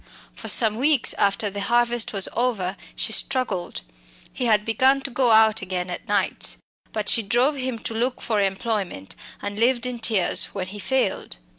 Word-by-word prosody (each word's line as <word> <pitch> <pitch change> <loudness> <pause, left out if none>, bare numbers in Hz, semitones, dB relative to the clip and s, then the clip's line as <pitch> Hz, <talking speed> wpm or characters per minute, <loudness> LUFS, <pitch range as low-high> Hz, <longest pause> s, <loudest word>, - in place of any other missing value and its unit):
For - - -9
some 220 -2 +4
weeks 280 0 +3
after 200 +1 +1
the 200 +1 -5
harvest 240 +1 +1
was 195 -2 +2
over 210 -7 -1 0.2
she 220 - +1
struggled. 205 - 0 0.5
He 250 - -3
had 210 -2 +2
begun 260 +5 +2
to 275 - -5
go 250 0 +1
out 220 -1 +5
again 180 -1 -4
at 175 - -7
nights. 205 0 0 0.3
But 210 -1 -4
she 230 - +4
drove 240 +8 +1
him 255 -2 -2
to 225 - -6
look 245 +3 -2
for 215 -3 -1
employment, 195 - -3 0.3
and 205 +1 -5
lived 240 +1 +2
in 250 -1 -4
tears 220 -5 +2
when 185 -2 -4
he 205 +2 -9
failed. 255 - -2
220 Hz, 175 wpm, -23 LUFS, 200-245 Hz, 0.5 s, out